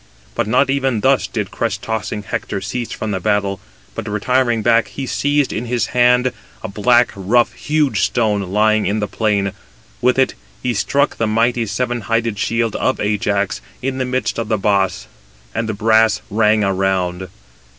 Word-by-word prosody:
But - - -1
not 130 +4 +3
even 135 -5 0
thus 135 +2 +3
did 105 -4 -4
crest 110 -4 -2
tossing 110 -2 -3
Hector 100 - -3
cease 115 +5 -4
from 110 - -4
the 95 - -1
battle: 100 0 0 0.3
but 115 -1 -6
retiring 120 +2 +1
back, 115 0 +3
he 135 - -6
seized 145 +1 0
in 115 - -3
his 120 0 0
hand, 125 +1 +4 0.3
a - - -3
black, 120 +5 +3
rough, 110 +5 +2
huge 150 -2 0
stone, 110 -4 +1
lying 110 0 +3
in 105 +3 0
the 105 - -1
plain. 100 -2 0 0.5
With 125 +1 +3
it 130 - +3 0.3
he 125 - 0
struck 140 +7 +1
the 115 - 0
mighty 115 +1 +1
seven 120 +3 -2
hided 115 0 -1
shield 115 +1 0
of 130 - 0
Ajax, 105 -1 0 0.2
in 135 0 -2
the 130 - 0
midst 125 -1 -1
of 115 - -2
the 110 0 +1
boss, 100 -3 +1 0.5
and 115 0 -2
the 110 - -2
brass 110 0 +3
rang 105 0 +3
around. 95 -2 0
110 Hz, 170 wpm, -18 LUFS, 105-125 Hz, 0.5 s, hand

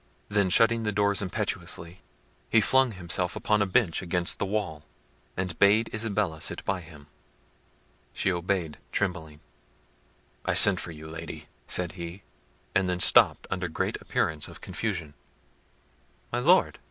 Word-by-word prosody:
Then 100 -2 +1
shutting 115 +4 +4
the 105 -1 -1
door 100 0 +1
impetuously, 90 -2 -4 0.5
he 115 - +5
flung 130 +2 +3
himself 90 -1 -1
upon 105 -1 +1
a 100 - +1
bench 95 -2 +1
against 90 -1 -1
the 100 - -1
wall, 95 -7 -3 0.6
and 90 -3 -3
bade 105 +3 +4
Isabella 105 -7 -1
sit - - -2
by 95 -1 -1
him. 80 -3 -14 1.1
She 95 - 0
obeyed 85 -2 -2
trembling. 80 -5 -3 1.0
"I - - 0
sent - - +8
for - - -5
you, 80 -1 -10
Lady," 80 -1 -9 0.2
said 90 -2 0
he—and 90 +1 -6
then 90 0 -1
stopped - - +6
under 90 -1 -2
great 80 - -3
appearance 75 -1 -1
of - - -12
confusion. 85 -10 -4 1.2
"My - - -1
Lord!" 175 +9 +3
90 Hz, 140 wpm, -27 LUFS, 85-105 Hz, 1.2 s, sent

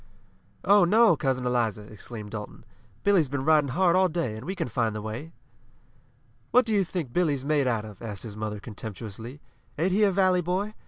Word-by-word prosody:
"Oh, 200 0 +6
no, 210 +1 +5
Cousin 130 -3 -1
Eliza!" 115 -4 0
exclaimed 105 0 -9
Dalton. 105 +1 -8 0.4
"Billy's 195 -7 +4
been 135 0 -3
riding 155 -2 +4
hard 175 +5 +2
all 185 0 +4
day, 160 -10 -2
and 110 +4 -8
we 190 - -3
can 170 -6 -2
find 115 -2 -1
the - - -3
way." 115 +9 -6 1.2
"What 250 - +4
do 225 - -1
you 200 -2 +3
think 170 -8 -5
Billy's 145 -7 +1
made 145 -2 +2
out 115 -3 0
of?" 105 -3 -12
asked 105 -4 -6
his 110 -3 -8
mother 105 -1 -4
contemptuously. 110 +4 -8 0.4
"Ain't 175 +5 +1
he 200 +4 +2
a 205 - +5
valley 185 -1 +3
boy? 185 +5 -2
140 Hz, 195 wpm, -26 LUFS, 110-180 Hz, 1.2 s, Oh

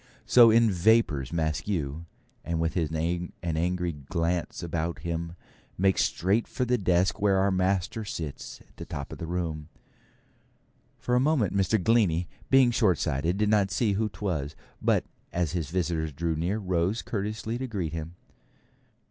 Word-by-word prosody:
So 120 -2 +7
in 115 0 +5
vapours 90 - +2
Maskew, 80 -1 -2 0.4
and 85 -1 -2
with 80 0 -1
an 85 +1 -1 0.2
angry 85 +2 -1
glance 85 +4 -2
about 85 0 -2
him 85 0 -4 0.4
makes 95 +1 +3
straight 100 +6 0
for 125 - -2
the 125 0 +1
desk 90 +1 +1
where 100 -2 +3
our 100 +1 +2
master 95 +3 0
sits 80 -8 -6
at - - -24
the - - -7
top 70 0 -6
of - - -8
the 80 - -5
room. 80 -3 -3 1.3
For 125 - -3
a 125 - +5
moment 130 - +2
Mr. 100 +2 +2
Glennie, 90 -5 +2 0.2
being 130 -2 +6
shortsighted, 90 - +1
did 105 0 +1
not 105 -2 +3
see 100 +2 +1
who 110 +2 0
'twas; 90 -7 -3 0.3
but - - +2 0.3
as 85 -3 -1
his 85 -4 -3
visitor 85 -2 -1
drew 80 +3 -2
near, 85 +7 -1
rose 95 +1 -1
courteously 110 +2 -3
to 130 - -3
greet 95 -9 -3
him. 80 +1 -6
90 Hz, 155 wpm, -27 LUFS, 80-105 Hz, 1.3 s, So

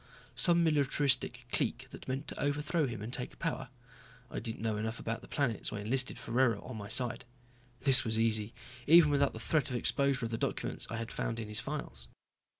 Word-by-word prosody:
Some 170 -1 +6
militaristic 140 -5 +2
clique - - 0
that - - -11
meant 135 +3 -3
to - - -5
overthrow 150 +2 0
him 115 -4 -6
and 115 +3 -6
take 125 - -5
power? 135 -6 -3 0.6
I - - -3
didn't 110 -1 -5
know 110 -2 0
enough 110 +2 -3
about 115 0 -4
the - - -13
planet, 140 -9 -1
so - - -3
I 105 - -4
enlisted 125 +4 +1
Ferraro 120 -3 +1
on 125 - -8
my 100 -1 -7
side. 120 +1 -1 0.6
This 130 -2 +7
was 110 -2 -1
easy 110 -1 +1 0.4
even 160 -1 +7
without 140 -1 +2
the 110 - -7
threat 150 +5 0
of 125 - -3
exposure 135 +1 +1
of 115 - -5
the 115 - -3
documents - - -2
I 115 - -4
had 115 0 -5
found 115 - -3
in 110 -2 -6
his 105 +1 -1
files. 135 - -6
125 Hz, 205 wpm, -32 LUFS, 115-140 Hz, 0.6 s, This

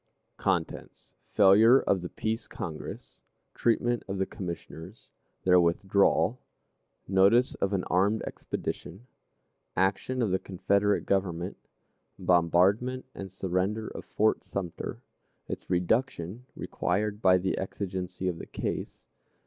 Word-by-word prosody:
_ - - -16
CHAPTER - - 0
I. - - -19 0.2
Failure 110 +6 +7
of 95 - +1
the 90 - -5
Peace 110 +1 -3
Congress. 80 -2 -7 0.3
Treatment 120 +1 +1
of 95 0 -3
the 95 - +1
Commissioners. 90 +1 -8 0.3
Their 90 -1 +6
Withdrawal. 95 +3 +2 0.7
Notice 100 +7 +4
of 100 - +1
an 95 -3 0
Armed 100 +5 +1
Expedition. 100 +8 -5 0.7
Action 100 +7 +1
of 105 - 0
the 95 - +2
Confederate 100 +2 +1
Government. 95 -2 -1 0.6
Bombardment 95 +9 +2
and 95 -1 -7
Surrender 95 +4 -1
of - - -8
Fort 110 +1 +1
Sumter. 90 -4 -5 0.4
Its - - -6
Reduction 95 +3 -1
required 105 +3 -2
by 95 -3 +6
the 95 +1 -1
Exigency 95 -1 -4
of 85 -2 -2
the - - -8
Case. - - -5
95 Hz, 120 wpm, -28 LUFS, 90-105 Hz, 0.7 s, Failure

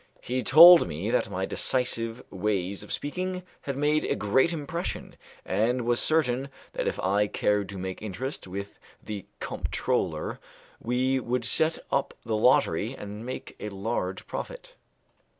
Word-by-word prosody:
He 125 +1 -2
told 170 - +9
me 85 +8 -3
that 125 - +1
my 95 -1 -2
decisive 120 0 -1
way 95 -1 -1
of 100 - -6
speaking 180 +5 -3 0.2
had 140 -1 -4
made 150 +1 +2
a - - 0
great 110 +10 +2
impression, 165 +2 -4 0.3
and 110 +6 +1
he - - -2
was 120 0 +1
certain 140 -4 +1 0.2
that - - -2
if - - -2
I 100 +2 +2
cared 105 -1 0
to 100 - -6
make 95 0 -5
interest 110 +4 -5
with 100 +2 -7 0.2
the 105 -3 -6
comptroller - - -2 0.4
we 130 +2 +1
could 125 -1 -2
set 160 +5 +3
up 140 - 0
the 110 - -1
lottery 110 -1 +3
and 105 +2 -7
make 130 - -6
a 105 - -4
large 100 -1 -3
profit. - - -7
115 Hz, 150 wpm, -27 LUFS, 100-135 Hz, 0.4 s, told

